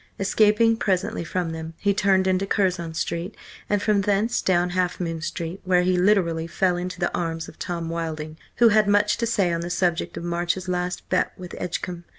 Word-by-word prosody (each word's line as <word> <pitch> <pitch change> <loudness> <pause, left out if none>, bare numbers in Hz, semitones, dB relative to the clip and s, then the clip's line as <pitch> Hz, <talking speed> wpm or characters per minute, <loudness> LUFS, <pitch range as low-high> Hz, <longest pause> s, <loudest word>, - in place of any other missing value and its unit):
Escaping 215 +3 +3
presently 195 -1 -1
from 175 0 -2
them, 160 0 -6
he 200 0 +1
turned 190 -1 +3
into 190 +1 +1
Curzon 180 -5 0
Street, 170 +5 -3 0.3
and 205 -1 +1
from 210 -2 +3
thence 205 +3 +1
down 180 -1 +2
Half 180 0 0
Moon 165 -2 -3
Street, 170 +2 -4
where 180 -1 +3
he 185 0 +2
literally 180 -4 +2
fell 180 +1 +1
into 180 0 -5
the 175 - -1
arms 165 -2 -3
of - - -14
Tom 170 -2 -3
Wilding, 160 -2 -4 0.2
who 235 -1 +6
had 215 -1 +4
much 205 +1 +3
to 235 - -1
say 195 -6 +1
on 170 - -1
the 170 - -4
subject 175 -2 -1
of - - -5
March's 175 +2 -1
last 180 0 -2
bet 185 - +1
with 180 -1 -9
Edgecumbe. 175 0 -4
180 Hz, 195 wpm, -24 LUFS, 170-200 Hz, 0.3 s, who